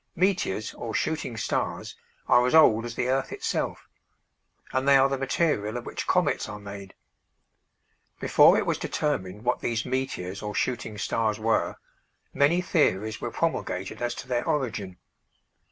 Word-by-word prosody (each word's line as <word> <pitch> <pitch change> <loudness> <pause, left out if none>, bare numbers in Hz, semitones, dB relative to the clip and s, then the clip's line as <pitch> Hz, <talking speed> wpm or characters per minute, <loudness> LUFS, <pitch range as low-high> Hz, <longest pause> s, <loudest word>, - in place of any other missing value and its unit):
Meteors 175 - 0
or 115 -2 -6
shooting 155 -7 -2
stars 105 - -2 0.3
are 125 0 +5
as 125 - +2
old 115 -8 +6
as 120 0 -6
the 125 - -1
earth 135 +1 0
itself, - - -3 0.9
and 130 +1 0
they 140 -1 +7
are 135 0 +5
the 135 - -1
material 135 -5 0
of 120 - -7
which - - -5
comets - - +1
are 105 - -6
made. 100 -1 -9 1.2
Before - - +6
it - - 0
was - - -1
determined 105 -9 -2
what 125 0 +1
these 115 0 -2
meteors 110 -8 -3
or 105 0 -5
shooting 115 -4 -2
stars 110 +1 0
were, 110 +1 +1 0.6
many 145 +6 +3
theories 110 - +1
were 120 - -2
promulgated 105 - -2
as 120 0 -1
to - - -8
their 120 -2 0
origin. 115 - -2
120 Hz, 155 wpm, -26 LUFS, 105-135 Hz, 1.2 s, they